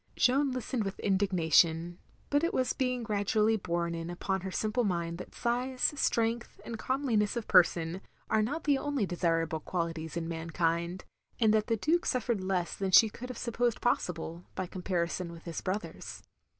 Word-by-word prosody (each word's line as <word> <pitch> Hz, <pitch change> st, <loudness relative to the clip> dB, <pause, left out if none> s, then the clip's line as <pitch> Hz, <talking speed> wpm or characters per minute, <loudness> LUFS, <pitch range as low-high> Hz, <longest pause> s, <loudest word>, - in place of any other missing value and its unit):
Jeanne 270 Hz, +2 st, +3 dB
listened 250 Hz, -2 st, -2 dB
with 195 Hz, 0 st, -4 dB
indignation; 175 Hz, -3 st, +2 dB, 0.3 s
but 290 Hz, +2 st, +3 dB
it 335 Hz, -, 0 dB
was 255 Hz, -, +1 dB
being 250 Hz, -2 st, -1 dB
gradually 215 Hz, +1 st, +2 dB
borne 170 Hz, -4 st, -1 dB
in 165 Hz, 0 st, -4 dB
upon 190 Hz, +2 st, -2 dB
her 190 Hz, -, -4 dB
simple 215 Hz, +5 st, 0 dB
mind 170 Hz, -4 st, -1 dB
that -, -, -9 dB
size, 250 Hz, +3 st, 0 dB
strength, 235 Hz, -3 st, 0 dB
and 230 Hz, -2 st, -5 dB
comeliness 245 Hz, -6 st, 0 dB
of 230 Hz, -, -4 dB
person, 170 Hz, 0 st, +4 dB, 0.3 s
are 220 Hz, -, +2 dB
not 285 Hz, +9 st, -2 dB
the 285 Hz, -2 st, +3 dB
only 285 Hz, -7 st, 0 dB
desirable 165 Hz, -2 st, 0 dB
qualities 165 Hz, 0 st, -3 dB
in 165 Hz, -1 st, -2 dB
mankind; 170 Hz, +2 st, -1 dB, 0.3 s
and 220 Hz, -3 st, +4 dB
that 215 Hz, -1 st, +2 dB
the 225 Hz, -2 st, +1 dB
Duke 330 Hz, -, +1 dB
suffered 235 Hz, -6 st, 0 dB
less 185 Hz, -2 st, -1 dB
than 195 Hz, -1 st, -2 dB
she 220 Hz, +4 st, +7 dB
could 250 Hz, +3 st, -8 dB
have 250 Hz, -, -6 dB
supposed 235 Hz, 0 st, 0 dB
possible, 170 Hz, -6 st, -1 dB
by 185 Hz, -, -2 dB
comparison 175 Hz, -1 st, -2 dB
with 165 Hz, -1 st, -11 dB
his 170 Hz, -2 st, -5 dB
brothers. 185 Hz, -3 st, -5 dB
195 Hz, 170 wpm, -30 LUFS, 170-235 Hz, 0.3 s, she